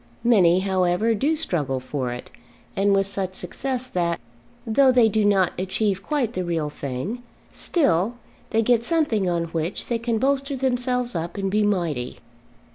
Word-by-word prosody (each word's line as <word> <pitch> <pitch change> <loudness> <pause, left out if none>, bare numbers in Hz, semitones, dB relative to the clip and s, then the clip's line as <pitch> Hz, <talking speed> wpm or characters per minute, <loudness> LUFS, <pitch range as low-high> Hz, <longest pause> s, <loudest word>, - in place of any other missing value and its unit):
Many, 185 -7 +5
however, 190 +3 +1
do 285 +9 +1
struggle 150 - -1
for 130 -1 -3
it, 125 - -8 0.4
and 200 +1 +2
with 195 0 +3
such 195 -1 -3
success 255 +8 -3
that, 170 -7 -1 0.5
though 260 +4 +4
they 245 -3 +5
do 220 0 +1
not 195 -3 +3
achieve 190 +1 -1
quite 265 -5 -1
the 185 - -2
real 165 -4 -2
thing, 145 - -4 0.3
still 225 - +1 0.3
they 225 0 +2
get 235 0 +3
something 235 - +1
on 170 -1 0
which 165 +2 -3
they 235 -1 0
can 230 -1 -1
bolster 275 +3 0
themselves 250 -1 0
up 170 +3 -4
and 195 -1 -1
be 210 +2 +2
mighty. 170 -12 -1
200 Hz, 160 wpm, -23 LUFS, 175-245 Hz, 0.5 s, Many